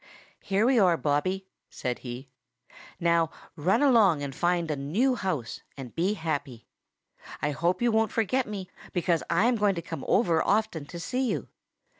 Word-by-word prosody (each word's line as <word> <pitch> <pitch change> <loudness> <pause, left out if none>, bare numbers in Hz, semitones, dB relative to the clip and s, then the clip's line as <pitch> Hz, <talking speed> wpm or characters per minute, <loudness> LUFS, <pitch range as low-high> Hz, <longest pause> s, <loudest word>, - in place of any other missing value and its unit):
"Here 200 +3 +1
we 255 -1 +4
are, 180 -4 +4
Bobby," 185 +7 0 0.2
said 125 -1 -4
he. 130 +2 -8 0.7
"Now 170 -1 +2 0.3
run 180 - +2
along 210 - +5
and 140 -1 -4
find 175 0 0
a - - 0
new 180 - +1
house 180 - -3 0.2
and 130 -3 -8
be 185 +5 0
happy. 145 - -4 0.7
I 150 - 0
hope 175 - 0
you 240 - +3
won't 220 0 +2
forget 240 +4 0
me, 200 -3 -5 0.3
because 175 -2 +1
I 180 +6 +3
am 240 0 +3
going 205 -2 +2
to 170 - -3
come 165 - -6
over 170 -7 +3
often 205 -7 0
to 170 - -8
see 255 +7 -1
you. - - -3
175 Hz, 170 wpm, -27 LUFS, 155-215 Hz, 0.7 s, along